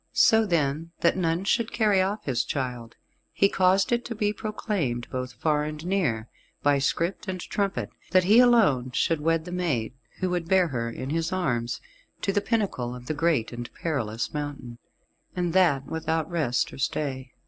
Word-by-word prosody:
So 220 -1 +5
then, 165 -1 0
that 170 - +4
none 170 -1 0
should 225 +3 +1
carry 210 -4 +3
off 200 +3 -1
his 125 -4 +1
child, 125 -4 -4 0.4
he 200 - +3
caused 190 +4 +3
it 240 0 +1
to 235 - -5
be 210 -1 0
proclaimed, 190 - -2
both 130 -1 -4
far 150 +2 +1
and 150 +1 -5
near, 150 - 0 0.4
by 145 -1 +4
script 170 +8 -1
and 185 -1 -3
trumpet, 200 +2 -2 0.2
that 185 0 +4
he 210 +6 +6
alone 215 - +4
should 160 +5 +1
wed 165 +1 +1
the 180 - -7
maid, 155 -11 -1 0.3
who 185 -1 0
would 175 -2 -1
bear 185 -3 +4
her 115 -4 -2
in 130 +4 -5
his 165 +2 -1
arms, 125 -11 -1 0.4
to 195 - +1
the 205 - +2
pinnacle 195 - -1
of 125 0 -10
the 155 - -2
great 145 -7 +1
and 120 0 -6
perilous 120 -9 -2
mountain, 145 -5 -5 0.6
and 175 -2 -1
that 160 -8 +3
without 160 0 -2
rest 150 -8 0
or - - -10
stay. 130 -2 -2
165 Hz, 180 wpm, -26 LUFS, 130-190 Hz, 0.6 s, he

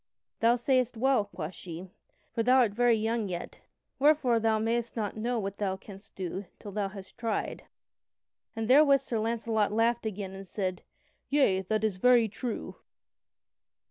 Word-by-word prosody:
"Thou 230 +1 +4
sayest 250 -1 +1
well," 260 -3 +3
quoth 180 -4 -6
she, 180 +1 -9 0.4
"for 230 - 0
thou 250 +3 +4
art 240 -5 +4
very 240 +1 +4
young 220 0 -1
yet, 175 -1 -6 0.4
wherefore 275 -5 +4
thou 225 -1 +2
mayst 230 +2 -1
not 215 -4 -2
know 235 +3 -1
what 200 -2 -4
thou 190 -2 -1
canst 195 0 -14
do 190 +1 -4
till 205 - -9
thou 200 0 -1
hast 195 +2 -11
tried." 225 -3 -2 0.9
And 225 -1 -2
therewith 275 +1 +6
Sir 235 -4 -2
Launcelot 225 -1 0
laughed 230 +1 +1
again, 200 -2 -5
and 195 0 -9
said: 185 -1 -3 0.5
"Yea, 270 -10 +3
that 215 +3 -1
is 210 -4 0
very 240 +2 +5
true." 220 +2 -5
220 Hz, 160 wpm, -29 LUFS, 195-240 Hz, 0.9 s, therewith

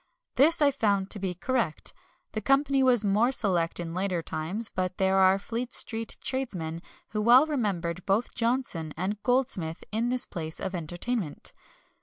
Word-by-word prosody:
This 310 +4 +5
I 285 - +5
found 200 -7 0
to 210 - 0
be 185 -2 -3
correct. 230 -3 -1 0.4
The 215 - -3
company 275 +3 +3
was 250 -4 +4
more 210 +5 +3
select 180 -9 +2
than 170 -1 -3
in - - -7
later 185 -2 -1
times, 175 +10 -3
but 185 0 -2
there 190 0 +2
are 190 0 +5
Fleet 235 +4 -4
Street 225 -1 -1
tradesmen 180 -12 -3 0.3
who 210 - -2
well 245 +6 +7
remembered 190 - -2
both 205 +5 +1
Johnson 230 - -1
and 200 +4 -2
Goldsmith 240 -11 0
in 225 +3 0
this 250 0 -1
place 160 -2 -6
of 190 - -3
entertainment." 175 +2 -2
205 Hz, 165 wpm, -28 LUFS, 180-245 Hz, 0.4 s, well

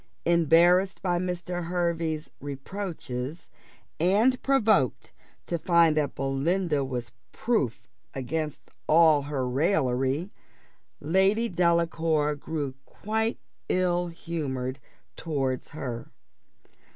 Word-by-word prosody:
Embarrassed 170 +3 +4
by 175 -2 +1
Mr. 180 -1 -3
Hervey's 170 -3 -1
reproaches, 145 -1 -6 0.5
and 210 +10 +3
provoked 220 - +2 0.3
to 170 - -2
find 170 -2 +4
that 150 -2 0
Belinda 145 +3 0
was 125 -4 -4 0.2
proof 130 - -1 0.3
against 150 +3 -4 0.2
all 155 -2 +6
her 140 -3 -2
raillery, 135 +2 +1 0.7
Lady 190 +8 +2
Delacour 165 -4 +1
grew 145 -2 -4
quite 220 +8 -2 0.3
ill 180 -1 +1
humoured 140 -6 -4 0.4
towards 135 -5 -2
her. 125 -6 -6
165 Hz, 90 wpm, -27 LUFS, 140-180 Hz, 0.7 s, all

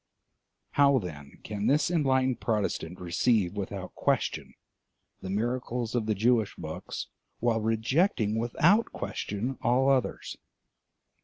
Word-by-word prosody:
How, 140 -1 +5
then, 75 - -6
can 105 -1 -3
this 150 +5 +3
enlightened 130 -6 +2
Protestant 100 -5 -2
receive 90 +2 +1
without 100 -2 -5
question - - -1 0.7
the 95 - -6
miracles 120 +2 -2
of 115 -3 0
the 110 - +1
Jewish 110 0 +2
books - - -6 0.3
while 115 -1 +1
rejecting 115 - +1
without 170 - +3
question 115 +6 -4
all 130 +3 +3
others? 130 -3 -1
115 Hz, 110 wpm, -28 LUFS, 105-130 Hz, 0.7 s, How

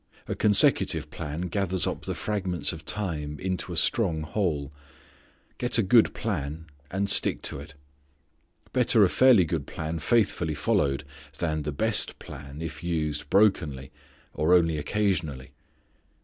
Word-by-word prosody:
A - - -2
consecutive 105 -2 +3
plan 75 +3 -5
gathers 95 -1 0
up - - -4
the - - -3
fragments 95 -6 -2
of 80 0 -10
time 75 -8 -3
into 95 -1 -3
a - - -4
strong 80 -2 +1
whole. 80 -7 -2 0.9
Get 120 -1 +1
a 115 - +3
good 110 +4 +4
plan, 75 +3 -4 0.2
and 100 +2 -1
stick 100 - +2
to - - -3
it. 70 0 -11 1.0
Better 120 -4 +4
a - - +1
fairly 125 -7 +5
good 80 -3 -3
plan 80 +1 -4
faithfully 90 -5 +1
followed, 70 0 0 0.3
than 80 -3 -1
the 75 0 -3
best 110 +9 +1
plan 70 +3 -9
if 80 +1 -7
used 75 -4 -2
brokenly 80 -10 +2 0.4
or 85 +4 +3
only 85 -3 +2
occasionally. 80 -7 -1
85 Hz, 140 wpm, -26 LUFS, 75-100 Hz, 1.0 s, fairly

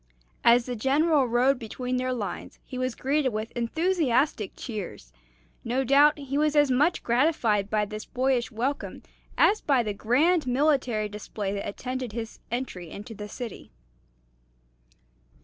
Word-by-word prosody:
As 235 0 +5
the 250 - -4
General 280 +4 +2
rode 250 +3 +2
between 250 +2 -3
their 255 0 -1
lines 220 -6 -5
he 255 - -6
was 255 -1 -1
greeted 275 0 +1
with 215 -1 -4
enthusiastic 280 - 0
cheers. 195 - -7 0.5
No 250 +3 0
doubt 285 +4 +5
he 280 0 -3
was 305 0 +2
as 290 -2 +4
much 295 +7 +2
gratified 235 -6 +2
by 210 -1 +1
this 215 +1 -7
boyish 255 -1 0
welcome 255 +6 -3 0.3
as 430 - +4
by 270 -4 +2
the 210 -2 -2
grand 290 - +2
military 250 -5 +1
display 205 -1 -5
that 200 - -4
attended 255 +1 -5
his 230 -1 -6
entry 235 -9 -4
into 210 +6 -8
the 210 0 -8
city. 235 -1 -7
250 Hz, 145 wpm, -26 LUFS, 220-275 Hz, 0.5 s, As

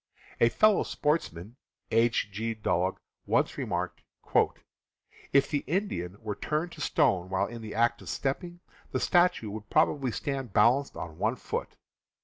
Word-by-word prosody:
A 115 - +6
fellow 215 - +4
sportsman, 120 - -2 0.3
H. 115 -2 +2
G. 110 +3 -3
Dulog, 95 -3 0 0.3
once - - +2
remarked: - - -3 1.3
"If 140 - +4
the 145 - -1
Indian 125 - -2
were 110 -2 -3
turned 155 - -2
to - - -10
stone 95 - +2
while 95 0 +1
in 120 0 -8
the 110 -1 -7
act 120 +1 +2
of - - -9
stepping, 175 +6 -3 0.3
the - - -1
statue 175 - +3
would 105 0 -8
probably 145 -4 +2
stand 135 -1 -3
balanced 125 +7 +3
on 80 -1 -7
one - - +1
foot. - - -4
120 Hz, 145 wpm, -29 LUFS, 105-150 Hz, 1.3 s, A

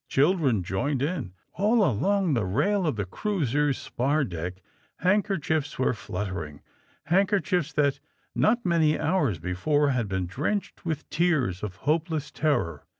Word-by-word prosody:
Children 140 - +2
joined 125 +10 -1
in. 145 - -2 0.2
All 210 +3 +3
along 185 - +1
the 115 -5 +1
rail 155 - +1
of 150 - 0
the 100 -2 -2
cruiser's 145 - 0
spar 140 +5 0
deck 90 -5 -4 0.4
hand 190 +4 +2
kerchiefs 160 -7 -1
were 130 - +2
fluttering 90 - -5 0.2
— - - -28
^handkerchiefs 185 -4 +2
that, 140 -2 +2 0.3
not 240 +1 +2
many 165 -3 +3
hours 155 - +1
before, 115 - +1
had 120 -5 0
been 95 -1 -1
drenched 150 - -3
with 155 -2 -1
the - - -33
tears 150 - +1
of 100 -4 -5
hopeless 155 -1 0
terror. 110 - 0
145 Hz, 150 wpm, -26 LUFS, 105-175 Hz, 0.4 s, All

